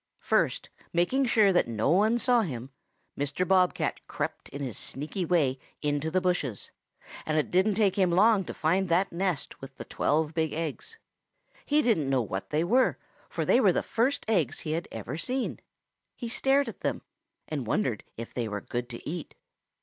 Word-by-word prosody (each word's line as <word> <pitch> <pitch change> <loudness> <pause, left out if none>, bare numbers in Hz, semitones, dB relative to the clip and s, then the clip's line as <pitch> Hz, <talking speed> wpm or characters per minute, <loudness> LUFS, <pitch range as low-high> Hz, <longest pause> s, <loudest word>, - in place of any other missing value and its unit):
"First - - +1 0.2
making 175 +11 +2
sure 215 -5 +4
that 175 - +3
no 115 +4 0
one 215 +6 +4
saw 245 0 +3
him, 130 - -5 0.4
Mr. 145 +6 -1
Bob 185 -1 +4
cat - - -2
crept - - -4
in 140 - -7
his 130 -7 -4
sneaky 155 +7 -4
way 145 -7 +2 0.2
into 145 +1 0
the 185 +3 +2
bushes, 175 - -2 0.5
and 155 0 -1
it 150 - 0
didn't 190 +3 +3
take 205 -3 +2
him 190 -2 +4
long 200 +3 +4
to - - -6
find 180 +4 +1
that 180 +4 +2
nest 175 -4 -2
with 135 0 -10
the - - -7
twelve 155 +1 0
big 160 -2 0
eggs. 165 - -4 0.7
He 300 +1 +3
didn't 160 - +2
know 130 -3 +2
what 95 -2 -5
they 155 +2 +1
were, 245 +9 +3 0.3
for - - -2
they - - +5
were - - +5
the - - 0
first 245 +5 0
eggs 180 - +1
he 155 - -4
had 165 +2 -2
ever 115 +6 -5
seen. 255 +8 -2 0.6
He 240 - -5
stared 270 +3 +2
at - - -7
them - - -2 0.4
and 140 -7 -4
wondered 120 - 0
if 115 0 -7
they 120 -2 -2
were 105 -1 -4
good 120 +3 -4
to 120 - -8
eat. 165 0 -5
170 Hz, 190 wpm, -28 LUFS, 140-200 Hz, 0.7 s, they